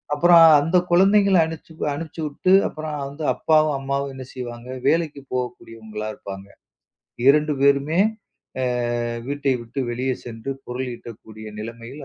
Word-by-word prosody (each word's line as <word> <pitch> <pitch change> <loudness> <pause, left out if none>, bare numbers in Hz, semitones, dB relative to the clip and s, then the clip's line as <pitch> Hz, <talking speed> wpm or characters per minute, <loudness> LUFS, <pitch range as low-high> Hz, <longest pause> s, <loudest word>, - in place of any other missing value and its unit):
அப்புறம் 170 +1 +7 0.2
அந்தக் 175 +4 +1
குழந்தைங்கள 195 +1 +5
அனிச்சு 160 0 -9 0.2
அனிச்சுட்டு 160 +3 -1 0.2
அப்புறம் 155 -1 -6
வந்து 150 +2 -8
அப்பாவும் 155 -2 +2
அம்மாவும் 140 0 -2
என்ன 130 -1 -8
செய்வாங்க? 120 -1 -7 0.2
வேலைக்கு 160 -4 +1
போகக்கூடியவங்களா 115 -3 -5
இருப்பாங்க. 95 0 -9 0.8
2 150 +2 +5
பேருமே, 140 +4 +3 0.6
அ - - +1 0.6
வீட்டை 140 -1 0
விட்டு 120 +4 -6
வெளியே 130 +2 -1
சென்று 115 +2 -6 0.2
பொருள் 125 +1 -4
ஈட்டக்கூடிய 110 -2 -11
நிலைமையில் 115 +5 -8
140 Hz, 120 wpm, -22 LUFS, 120-155 Hz, 0.8 s, அப்புறம்